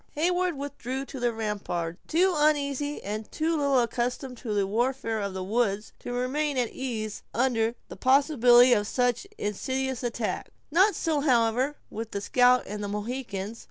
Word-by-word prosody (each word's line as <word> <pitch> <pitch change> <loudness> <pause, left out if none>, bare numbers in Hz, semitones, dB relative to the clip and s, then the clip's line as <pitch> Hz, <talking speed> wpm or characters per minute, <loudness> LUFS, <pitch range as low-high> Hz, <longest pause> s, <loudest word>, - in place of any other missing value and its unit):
Heyward 355 +1 +1
withdrew 270 -1 -4
to 270 - -8
the 240 -1 +1
rampart, 200 -6 -3
too 365 +3 +3
uneasy 290 -1 +1
and 210 +2 -5
too 320 +1 0
little 280 -3 +3
accustomed 250 +2 -2
to 230 - -5
the 205 -1 +1
warfare 230 +2 -1
of 200 -2 -3
the 190 - -3
woods 210 0 -1
to - - -6
remain 265 +4 -1
at 245 -3 0
ease 220 -5 -4
under 230 -1 +1
the - - -9
possibility 255 -3 +5
of 205 -3 +1
such 245 - 0
insidious 260 +5 -2
attacks. 235 -3 -3 0.2
Not 380 +6 +4
so, 320 -3 0
however, 255 0 +2 0.2
with 225 +1 -5
the 200 - -2
scout 250 +3 +4
and 210 +1 -5
the - - -2
Mohicans. 210 0 -4
245 Hz, 160 wpm, -27 LUFS, 215-280 Hz, 0.2 s, possibility